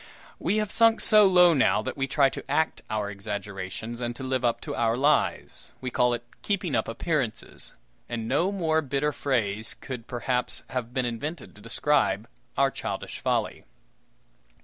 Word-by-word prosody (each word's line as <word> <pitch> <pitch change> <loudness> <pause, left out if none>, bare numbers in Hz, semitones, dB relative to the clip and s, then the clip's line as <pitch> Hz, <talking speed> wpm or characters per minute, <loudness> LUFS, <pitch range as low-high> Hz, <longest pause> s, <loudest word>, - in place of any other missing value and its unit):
We 195 +6 0
have 210 -1 -1
sunk 230 0 +4
so 215 -2 +7
low 180 -2 +6
now 125 -7 +3
that 130 - -4
we 135 -1 -1
try 140 -1 +3
to - - -7
act 155 +3 +1
our 105 -1 -2
exaggerations, 100 +3 -5
and 120 0 -2
to 135 - -8
live 130 -1 -1
up 120 -1 +1
to - - -5
our 115 0 +1
lies. 145 +2 +1
We 130 -1 -4
call 125 0 +3
it 120 - -8 0.2
"keeping 185 -6 -1
up - - +1
appearances;" 130 0 -3 0.4
and 115 -2 -3
no 155 +10 +1
more 160 -5 +1
bitter 140 +1 0
phrase 110 -7 -1
could, 125 -4 -8
perhaps, 125 +1 -2
have 125 -3 -3
been 130 0 -1
invented 140 +6 -5
to 105 - -16
describe 115 -3 +1 0.3
our 135 0 +3
childish - - -5
folly. - - -1
130 Hz, 170 wpm, -27 LUFS, 115-150 Hz, 0.4 s, so